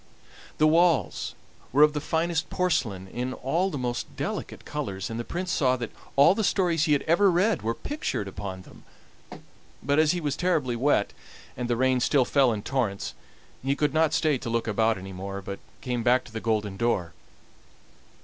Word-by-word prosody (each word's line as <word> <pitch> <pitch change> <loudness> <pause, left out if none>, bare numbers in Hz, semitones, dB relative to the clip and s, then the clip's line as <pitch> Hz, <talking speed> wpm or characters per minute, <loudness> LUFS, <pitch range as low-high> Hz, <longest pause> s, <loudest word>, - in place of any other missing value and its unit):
The 155 - +4
walls 165 0 +2 0.4
were 145 +3 +6
of 150 0 +5
the 150 - -2
finest 165 +1 -1
porcelain 115 - -1
in 125 +5 -4
all 170 +10 0
the 150 - -4
most 120 -2 -2
delicate - - -5
colors, 100 -10 -4
and 115 - -4
the - - -2
Prince 180 +7 -4
saw 130 -3 +2
that 120 -2 -5 0.2
all 140 +6 +7
the 220 - -1
stories 175 -5 +2
he 150 - +3
had 145 - +1
ever 185 +5 +4
read 185 +5 +2
were 115 +2 -1
pictured 290 - -3
upon 95 -1 -6
them; - - -16 1.0
but 145 +3 +2
as 155 -1 +4
he 175 - -1
was 145 -4 -2
terribly 155 -9 0
wet, 125 -4 +1 0.4
and 125 0 -4
the 120 - +1
rain 130 0 +2
still 130 +1 +3
fell 135 -2 +3
in 105 -2 -3
torrents, 115 -8 -2 0.5
he 135 +1 +1
could 145 -1 0
not 160 -1 +3
stay 155 -5 +2
to 115 - -5
look 115 0 -1
about 110 0 +2
any 95 0 -8
more, 95 +1 -5
but 100 0 -7 0.2
came 125 -2 -2
back 125 +2 +3
to - - -14
the 110 0 -5
golden 105 -3 -1
door. 95 -8 0
130 Hz, 190 wpm, -26 LUFS, 110-155 Hz, 1.0 s, all